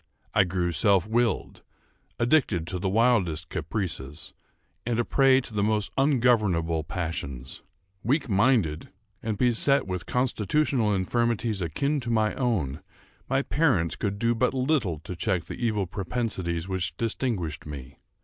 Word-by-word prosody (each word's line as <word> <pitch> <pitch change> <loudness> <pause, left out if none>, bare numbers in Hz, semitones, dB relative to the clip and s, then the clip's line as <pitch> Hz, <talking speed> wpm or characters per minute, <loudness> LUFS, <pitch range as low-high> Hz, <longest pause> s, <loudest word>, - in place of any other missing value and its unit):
I - - +5
grew 90 -1 -1
self 95 +3 +3
willed, 115 +2 0 0.6
addicted 120 - +2
to 90 +2 -4
the 95 +1 -1
wildest 95 -7 +2
caprices, 80 -4 -4 0.5
and 120 -1 -1
a 120 - +1
prey 135 -1 +4
to 120 - -10
the 105 - 0
most 105 0 0
ungovernable 110 - +2
passions. 75 -5 -5 0.4
Weak 140 +8 +1
minded, 100 - +2 0.3
and 110 -2 -2
beset 125 +4 +3
with 90 -2 -4
constitutional 125 -1 +1
infirmities 110 +2 0
akin 140 - 0
to 120 -3 -5
my 110 -2 +2
own, 95 - -1 0.5
my 135 +1 +2
parents 125 - +1
could 100 -1 -2
do 115 +2 +2
but 125 +3 +1
little 130 - +1
to 90 +3 -7
check 90 -2 -1
the - - -7
evil 105 -4 +1
propensities 90 -3 -3
which 95 -2 -2
distinguished 105 - -2
me. 70 -2 -9
105 Hz, 140 wpm, -26 LUFS, 85-120 Hz, 0.6 s, I